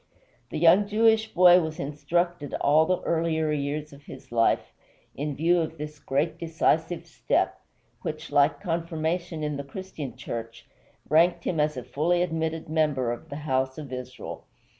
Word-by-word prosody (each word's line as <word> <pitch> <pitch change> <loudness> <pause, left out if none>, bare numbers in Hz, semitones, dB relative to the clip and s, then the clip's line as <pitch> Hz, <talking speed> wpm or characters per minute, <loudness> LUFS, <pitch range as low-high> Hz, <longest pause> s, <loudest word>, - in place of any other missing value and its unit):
The - - -4
young 175 +5 +5
Jewish 220 +1 +3
boy 180 0 +7
was 160 -1 -5
instructed 150 +2 -1
all 155 +3 +4
the 185 - +1
earlier 160 -2 0
years 150 +1 -3
of 140 - -14
his 130 - -12
life 115 -1 +2 0.4
in 145 0 -3
view 170 +4 +3
of 160 0 -4
this 150 0 -7
great 150 +4 -1
decisive 165 0 0
step, - - 0 0.4
which, - - -5
like 145 +1 +3
confirmation 165 -2 -2
in 150 -1 -2
the 140 - -4
Christian 150 -1 -7
Church, 115 0 -6 0.4
ranked 170 +2 +4
him 165 - -1
as 150 -1 +1
a 125 - -4
fully 175 +7 +1
admitted 160 -1 -2
member 150 -6 +1
of 120 - -7
the - - -6
house 130 -1 0
of 145 -4 -7
Israel. 125 0 -7
155 Hz, 160 wpm, -26 LUFS, 145-170 Hz, 0.4 s, boy